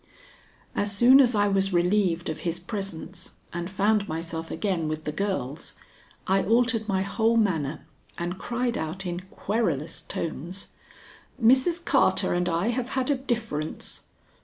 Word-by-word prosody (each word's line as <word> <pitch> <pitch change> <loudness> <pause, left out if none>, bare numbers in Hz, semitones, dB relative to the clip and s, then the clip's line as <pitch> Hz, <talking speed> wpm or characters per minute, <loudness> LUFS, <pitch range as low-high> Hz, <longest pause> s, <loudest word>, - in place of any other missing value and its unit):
As 205 0 +1
soon 245 +6 +7
as 245 -4 +5
I 205 0 +3
was 195 -1 +1
relieved 175 -1 +2
of 160 - -3
his 170 -1 -1
presence 190 -3 -5 0.2
and 175 +1 -3
found 205 +1 +2
myself 165 0 -4
again 170 -2 -1
with 155 0 -3
the 150 - -2
girls, 155 -6 -3 0.5
I 195 +1 +3
altered 225 +1 +2
my 190 -2 +1
whole 225 +3 +2
manner 160 -9 0 0.3
and 175 +2 -3
cried 240 0 -1
out 165 +5 -4
in 175 -1 -2
querulous 170 - -1
tones: 170 +5 -5 0.7
"Mrs. 265 +9 +4
Carter - - +3
and 180 0 +1
I 170 +6 +1
have 245 +1 -1
had 260 +2 +1
a - - +3
difference." 225 - -3
195 Hz, 145 wpm, -26 LUFS, 170-225 Hz, 0.7 s, soon